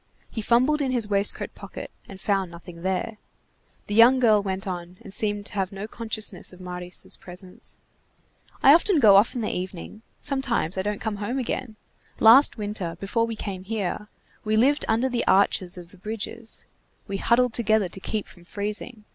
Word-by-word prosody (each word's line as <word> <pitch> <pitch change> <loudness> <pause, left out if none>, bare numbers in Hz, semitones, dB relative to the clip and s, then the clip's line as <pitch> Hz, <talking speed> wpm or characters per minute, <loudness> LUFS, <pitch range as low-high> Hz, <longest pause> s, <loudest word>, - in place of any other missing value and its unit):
He 225 - -4
fumbled 255 +7 +3
in 270 - 0
his 240 -4 0
waistcoat 200 0 0
pocket, - - -9 0.2
and 195 - -10
found 195 -2 0
nothing 170 0 -11
there. 190 +4 -2 0.7
The 205 - -5
young 235 +4 +7
girl 215 -4 +5
went 190 -1 -3
on, 180 -1 -6
and 195 - -5
seemed 205 -1 0
to - - -5
have 195 -2 -1
no 200 +2 -6
consciousness 220 -2 -2
of 180 - -15
Marius' 180 0 -4
presence. 180 0 -9 0.9
"I 275 - +9
often 340 +1 +4
go 210 -6 +7
off 205 +6 +4
in 245 - -2
the 215 - -1
evening. 185 +3 -6 0.2
Sometimes 265 - -1
I 190 - 0
don't 205 +1 -2
come 220 -2 -2
home 210 +6 -3
again. 250 -2 -3 0.4
Last 245 +6 +7
winter, 205 -6 -4
before 230 +4 0
we 230 - -4
came 195 -3 -5
here, 210 0 -3 0.4
we 215 0 0
lived 280 +6 +3
under 230 +4 +2
the 245 -2 -2
arches 190 -1 +3
of 175 0 -11
the 190 - -15
bridges. 225 +2 -5 0.4
We 195 - -3
huddled 240 +3 +2
together 220 -4 +2
to 190 - -9
keep 210 +2 -3
from 175 - -16
freezing. 210 +4 -5
210 Hz, 180 wpm, -25 LUFS, 190-230 Hz, 0.9 s, I